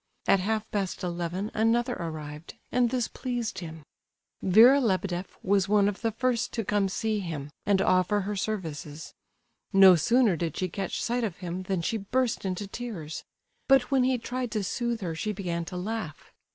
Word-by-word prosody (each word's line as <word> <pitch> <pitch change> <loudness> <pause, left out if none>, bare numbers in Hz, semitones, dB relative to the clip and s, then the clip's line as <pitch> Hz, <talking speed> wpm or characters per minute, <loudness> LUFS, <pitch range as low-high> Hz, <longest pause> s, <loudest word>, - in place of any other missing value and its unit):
At 195 - +4
half 215 +3 -1
past 195 -2 -2
eleven 175 +3 -3
another 235 +3 +2
arrived; 155 -3 -7 0.2
and 245 -1 +3
this 245 -2 0
pleased 245 -3 -4
him. 160 -3 -8 0.6
Vera 235 +9 +7
Lebedeff 185 -4 -1
was 195 0 +2
one 205 -1 +4
of 205 -1 -3
the 225 -1 0
first 240 +1 0
to 225 -3 -2
come 205 -1 +1
to - - -6
see 220 -1 0
him 155 -6 -5 0.2
and 195 -2 +3
offer 185 +3 +3
her 205 +2 -3
services. 160 -7 -4 0.6
No 195 -2 +8
sooner 230 - +3
did 165 -1 -3
she 185 - -1
catch 195 +3 -3
sight 240 0 0
of 200 -6 -3
him 180 0 -5
than 185 -3 0
she 225 - 0
burst 230 +2 -1
into 190 +2 -2
tears; 195 -8 -6 0.4
but 270 -1 +4
when 265 -2 +4
he 255 0 +2
tried 250 +1 -4
to 215 - -1
soothe 235 +3 -2
her 170 -4 -3
she 210 +6 -2
began 170 -4 -3
to 180 - -6
laugh. 185 - -5
200 Hz, 180 wpm, -28 LUFS, 180-230 Hz, 0.6 s, No